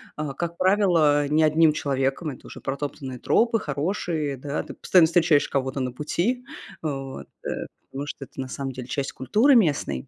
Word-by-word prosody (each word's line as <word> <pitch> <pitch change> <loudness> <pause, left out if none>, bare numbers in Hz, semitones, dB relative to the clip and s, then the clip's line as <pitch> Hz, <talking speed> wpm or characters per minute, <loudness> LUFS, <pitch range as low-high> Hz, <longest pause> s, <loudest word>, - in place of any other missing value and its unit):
А, 150 -2 -4
как 170 +4 -4
правило, 175 -7 +3
не 155 +2 +3
одним 155 0 +5
человеком, 135 +2 -1
это 135 - -10
уже - - -10
протоптанные 135 -2 -4
тропы, 230 - +2
хорошие, 150 -1 -2
да. 140 +3 -3
Ты - - -9
постоянно 175 -4 +5
встречаешь 165 -3 +3
кого-то 135 0 -1
на 125 - -2
пути, 180 - -1 0.4
вот, 135 -3 -5 0.2
э, - - -2 0.4
потому 140 +2 -5
что 145 - -6
это - - -16
на 130 - -3
самом 135 +1 -4
деле 125 -1 -8
часть 140 0 -2
культуры 215 - +3
местной. 145 - +1
145 Hz, 175 wpm, -25 LUFS, 135-170 Hz, 0.4 s, одним